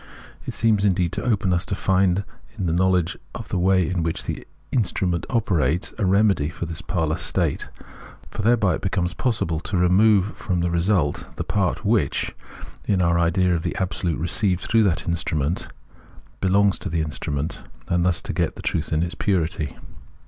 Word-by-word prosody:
It - - -4
seems 110 -3 +2
indeed 90 -4 +1
open 100 -6 +1
to - - +3
us 90 - -3
to 95 - -1
find 95 0 +2 0.3
in 95 - -2
the 80 - +1
knowledge 90 -1 +1 0.2
of - - -7
the - - 0
way 95 -1 +3
in 90 -1 -1
which 80 0 -2
the - - -5 0.3
instru 105 -6 +1
ment 85 -2 -1
operates, 90 - 0
a 105 - +1
remedy 100 -6 +3
for 85 - -5
this 80 -1 -4
parlous 80 -3 -1
state; - - 0 0.6
for - - -4
thereby 105 -4 +3
it - - -3
becomes 90 -2 -1
possible 90 -10 -1
to 95 +2 -3
remove 100 +3 +4
from 90 -5 -2
the 85 0 0
result 85 -3 +1
the - - -3
part 100 -4 -1
which, - - +1 0.5
in 100 -3 +2
our 85 -1 +3
idea 90 +2 +2
of 85 - 0
the - - -3
Absolute 90 -3 -1
received 90 +3 +1
through 115 +3 +2
that 85 -6 0
instrument, 80 -1 -1 0.7
belongs 100 +1 +3
to - - -4
the 80 0 0
instrument, 75 -1 -3 0.3
and 90 0 +1
thus 85 -2 +1
to - - -4
get - - 0
the - - -9
truth 80 - -1
in 80 +1 +2
its 85 - -3
purity. 80 -7 -1
90 Hz, 185 wpm, -23 LUFS, 85-100 Hz, 0.7 s, remove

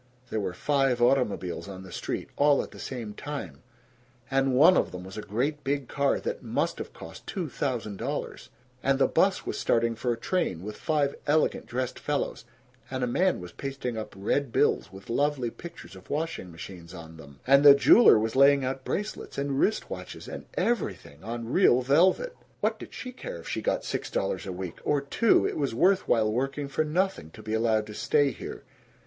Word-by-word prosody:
There 110 - 0
were 95 -3 -3
five 135 -2 +1
automobiles 115 -8 +1
on 95 -1 -8
the 95 - -11
street - - -4
all 145 0 +4
at - - -11
the - - -12
same 115 -5 -5
time 105 - -6 0.7
and 135 -1 +2
one 165 +8 +7
of - - +1
'em 90 - -7
was 95 +1 -10
a 105 - -4
great 135 +9 -2
big 140 -1 -1
car 140 -1 +1
that 475 +1 -4
must - - -1
of - - -6
cost - - -11
two 180 -6 -3
thousand 120 -8 -3
dollars 140 +7 -4 0.3
and 135 0 +2
the 140 - +4
'bus - - +2
was - - -3
starting 115 0 +2
for 120 +2 -2
a 115 - -1
train 115 - -1
with 105 +1 -6
five 145 -1 0
elegant 155 +2 +2
dressed 125 0 -3
fellows, - - -2 0.4
and 130 -1 -3
a - - +3
man 180 +10 +1
was 90 0 -9
pasting 135 +1 -4
up 110 -2 -6
red 120 +7 0
bills 85 - +2
with 95 0 -12
lovely 135 -1 0
pictures 170 - -11
of 95 - -15
washing 155 - -3
machines 85 +1 -10
on 80 -1 -10
them, 70 -3 -14
and 140 +2 +6
the 140 -1 +10
jeweler 140 - +7
was 110 +2 -1
laying 140 0 +6
out 130 +1 -3
bracelets 210 +8 -4
and 140 -1 -1
wrist 215 - +1
watches - - -7
and - - -8
EVERYTHING 195 - -2
on 115 +3 -5
real 130 -9 +5
velvet. 185 - +3 0.2
What - - 0
did - - -9
she 255 - -7
care 250 - -7
if 85 - -11
she - - -2
got - - -1
six - - -3
dollars - - -2
a - - -3
week? 90 -1 -6
Or 145 - +2
two! 140 +11 +3
It - - -4
was 140 -6 -1
worth 190 +8 +3
while 110 -2 +3
working 135 +4 -2
for 155 - 0
nothing, 175 - -1
to 110 - -12
be 110 +1 -4
allowed 110 -1 +2
to 105 - -9
stay 145 +5 +2
here. - - -8
130 Hz, 200 wpm, -27 LUFS, 105-145 Hz, 0.7 s, the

